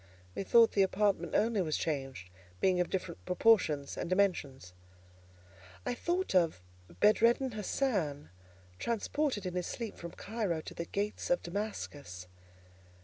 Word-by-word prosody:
Methought 230 Hz, +3 st, +5 dB
the 200 Hz, -, +2 dB
apartment 190 Hz, -3 st, +1 dB
only 220 Hz, -2 st, +2 dB
was 155 Hz, -4 st, 0 dB
changed, 135 Hz, -, -3 dB, 0.3 s
being 185 Hz, -1 st, +3 dB
of 180 Hz, -, +1 dB
different 180 Hz, -2 st, -4 dB
proportions 180 Hz, -7 st, +3 dB
and -, -, -4 dB
dimensions. 160 Hz, -, 0 dB, 1.1 s
I -, -, 0 dB
thought 350 Hz, -, -1 dB
of 170 Hz, -, +3 dB, 0.4 s
Bedreddin 235 Hz, -, +4 dB
Hassan, 195 Hz, -, -1 dB, 0.5 s
transported 235 Hz, 0 st, -1 dB
in 180 Hz, -, -3 dB
his 180 Hz, -1 st, -2 dB
sleep 230 Hz, -3 st, -5 dB
from 170 Hz, -1 st, -8 dB
Cairo 205 Hz, -7 st, -2 dB
to -, -, -9 dB
the 170 Hz, -, -4 dB
gates 205 Hz, +4 st, -3 dB
of 175 Hz, -, +2 dB
Damascus. 145 Hz, -, -5 dB
185 Hz, 130 wpm, -32 LUFS, 160-220 Hz, 1.1 s, Methought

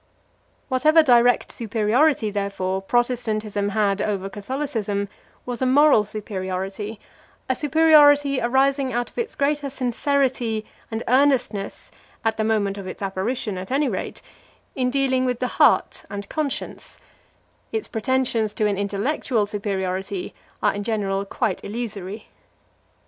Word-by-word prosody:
Whatever 305 Hz, +5 st, +4 dB
direct 245 Hz, -3 st, +4 dB
superiority, 225 Hz, +3 st, +1 dB
therefore, 195 Hz, -2 st, -2 dB
Protestantism 215 Hz, -2 st, 0 dB
had 205 Hz, -1 st, +1 dB
over 195 Hz, -2 st, -2 dB
Catholicism 210 Hz, -3 st, -3 dB, 0.4 s
was 245 Hz, 0 st, -5 dB
a 260 Hz, -, +2 dB
moral 280 Hz, -4 st, +5 dB
superiority, 200 Hz, 0 st, -5 dB, 0.5 s
a 260 Hz, -, +1 dB
superiority 290 Hz, -2 st, +5 dB
arising 265 Hz, +2 st, +2 dB
out 240 Hz, 0 st, -2 dB
of -, -, -32 dB
its 465 Hz, -1 st, -3 dB
greater 285 Hz, 0 st, 0 dB
sincerity 255 Hz, -3 st, 0 dB, 0.2 s
and 225 Hz, 0 st, -4 dB
earnestness, 255 Hz, -6 st, +1 dB, 0.3 s
at 225 Hz, 0 st, +2 dB
the 220 Hz, -, 0 dB
moment 205 Hz, -2 st, 0 dB
of 190 Hz, -, -7 dB
its 200 Hz, -, -7 dB
apparition 195 Hz, +1 st, -2 dB
at 185 Hz, -, -7 dB
any 280 Hz, +3 st, +1 dB
rate, -, -, -5 dB, 0.5 s
in 255 Hz, -2 st, 0 dB
dealing 260 Hz, -1 st, +1 dB
with 250 Hz, -2 st, 0 dB
the 250 Hz, +1 st, -3 dB
heart -, -, +4 dB
and 200 Hz, 0 st, -6 dB
conscience; 300 Hz, -3 st, -4 dB, 0.7 s
its 445 Hz, -2 st, -3 dB
pretensions 230 Hz, -2 st, 0 dB
to 215 Hz, -, +1 dB
an 200 Hz, -2 st, 0 dB
intellectual 210 Hz, +3 st, 0 dB
superiority 200 Hz, -, -3 dB, 0.3 s
are -, -, +3 dB
in 205 Hz, -, -4 dB
general 200 Hz, -3 st, -1 dB
quite -, -, -2 dB
illusory. 210 Hz, -2 st, -5 dB
225 Hz, 125 wpm, -23 LUFS, 205-265 Hz, 0.7 s, moral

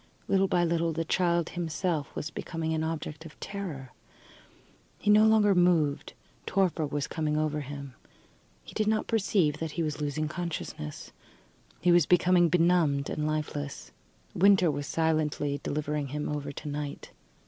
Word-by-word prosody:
Little 195 Hz, 0 st, +3 dB
by 175 Hz, -2 st, +2 dB
little 170 Hz, 0 st, +1 dB
the 165 Hz, +1 st, -2 dB
child 170 Hz, -1 st, +1 dB
himself 165 Hz, -2 st, -2 dB
was 160 Hz, -, -4 dB
becoming 160 Hz, -1 st, -3 dB
an 160 Hz, 0 st, -1 dB
object 160 Hz, -1 st, -4 dB
of 160 Hz, -2 st, -13 dB
terror. 170 Hz, -10 st, -6 dB, 1.1 s
He 210 Hz, -, +2 dB
no 215 Hz, +1 st, +7 dB
longer 215 Hz, -2 st, +5 dB
moved. 170 Hz, -5 st, +2 dB, 0.3 s
Torpor 180 Hz, -5 st, +1 dB
was 145 Hz, 0 st, -2 dB
coming 150 Hz, -1 st, -1 dB
over 155 Hz, -1 st, 0 dB
him. 140 Hz, -1 st, -7 dB, 0.7 s
He -, -, -12 dB
did 215 Hz, -, 0 dB
not 215 Hz, 0 st, +1 dB
perceive 190 Hz, -8 st, +1 dB
that 160 Hz, -2 st, -4 dB
he 170 Hz, -, -1 dB
was 150 Hz, -1 st, -3 dB
losing 150 Hz, +1 st, -1 dB
consciousness 155 Hz, -, -5 dB, 0.7 s
he 175 Hz, -, +4 dB
was 175 Hz, -3 st, +5 dB
becoming 175 Hz, -1 st, +4 dB
benumbed 165 Hz, -5 st, +2 dB
and 150 Hz, 0 st, -1 dB
lifeless. 150 Hz, -2 st, -4 dB, 0.4 s
Winter 190 Hz, -3 st, +5 dB
was 145 Hz, 0 st, -4 dB
silently 155 Hz, -3 st, 0 dB
delivering 150 Hz, -1 st, -2 dB
him 150 Hz, +2 st, -3 dB
over 145 Hz, -1 st, -3 dB
to 150 Hz, -, -8 dB
night. 145 Hz, 0 st, -5 dB
160 Hz, 150 wpm, -28 LUFS, 150-175 Hz, 1.1 s, no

